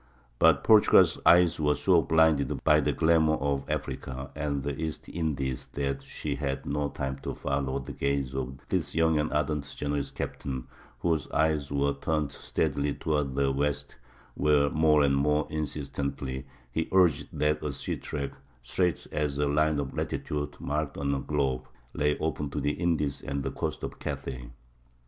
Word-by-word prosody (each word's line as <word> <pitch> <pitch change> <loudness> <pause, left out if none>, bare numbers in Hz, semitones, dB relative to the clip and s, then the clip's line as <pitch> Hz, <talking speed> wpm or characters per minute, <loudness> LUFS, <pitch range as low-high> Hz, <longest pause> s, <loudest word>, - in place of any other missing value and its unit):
But - - +5
Portugal's 110 -2 +6
eyes 85 -1 +6
were 75 -1 +2
so 90 -4 +4
blinded 80 -3 +2
by - - +5
the - - +1
glamour 80 -1 +3
of 70 0 -2
Africa 65 -3 -4
and 70 -2 -2
the 70 -1 -2
East 80 -1 -4
Indies 70 -6 -2
that 70 -1 -2
she - - -4
had 70 -2 -3
no 75 0 -1
time 65 -1 -4
to - - -5
follow 70 -1 -1
the 70 +1 -6
gaze 70 -1 -1
of 65 0 -4
this - - -1
young 80 -1 +3
and 75 - -1
ardent 75 -1 -1
Genoese 70 -1 -1
captain 65 -3 -5 0.4
whose 80 -3 0
eyes 75 -3 +1
were 70 0 +1
turned 75 0 -1
steadily 70 -1 -1
toward 75 -4 -1
the 70 0 +2
west, 70 +1 -1 0.4
where, 75 -1 +3
more 75 -1 +4
and 70 -1 +3
more 75 +2 +2
insistently, 70 -3 -3 0.2
he 80 +5 -2
urged 90 -5 +4
that 75 0 0
a 75 - -1
sea - - -3
track, 70 -2 -4 0.3
straight 90 +5 0
as 75 -2 -1
a 75 - +2
line 75 +1 +2
of 70 -2 -3
latitude 75 -1 -3
marked 75 0 -2
on 70 0 0
a 70 - 0
globe, 65 -3 -1 0.3
lay 75 0 +1
open 75 -2 -2
to - - -3
the 75 - +1
Indies 75 -5 0
and 70 0 -3
the - - -2
coasts - - -4
of - - -5
Cathay. 60 -2 -5
70 Hz, 165 wpm, -28 LUFS, 70-75 Hz, 0.4 s, Portugal's